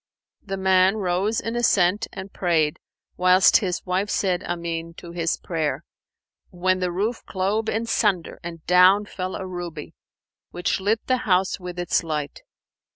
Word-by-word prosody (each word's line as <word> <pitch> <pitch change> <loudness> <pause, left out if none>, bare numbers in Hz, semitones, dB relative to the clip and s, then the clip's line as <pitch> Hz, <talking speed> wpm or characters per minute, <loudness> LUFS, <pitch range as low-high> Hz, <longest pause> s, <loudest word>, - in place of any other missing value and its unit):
The 195 -1 -5
man 190 +1 +4
rose 195 +3 0
in 230 +1 -4
assent 205 -3 +2
and 190 0 -8
prayed, 160 -4 +1 0.4
whilst 185 +1 +6
his 185 -5 -3
wife 190 +3 -1
said, 185 -3 0
"Amen," 170 -1 -4
to 170 - -10
his 170 -1 -1
prayer, 160 -4 -2 0.7
when 185 +1 0
the 180 -1 -1
roof 210 +7 -2
clove 205 +4 -1
in 225 +1 -1
sunder 205 -7 0
and 165 -2 -8
down 185 +4 +5
fell 185 -2 -5
a 190 - -5
ruby, 175 -4 -7 0.6
which 175 - -1
lit 210 +3 0
the 255 - +2
house 190 -5 +1
with 180 -1 -7
its 175 -1 0
light. 150 -3 -4
185 Hz, 155 wpm, -23 LUFS, 175-200 Hz, 0.7 s, whilst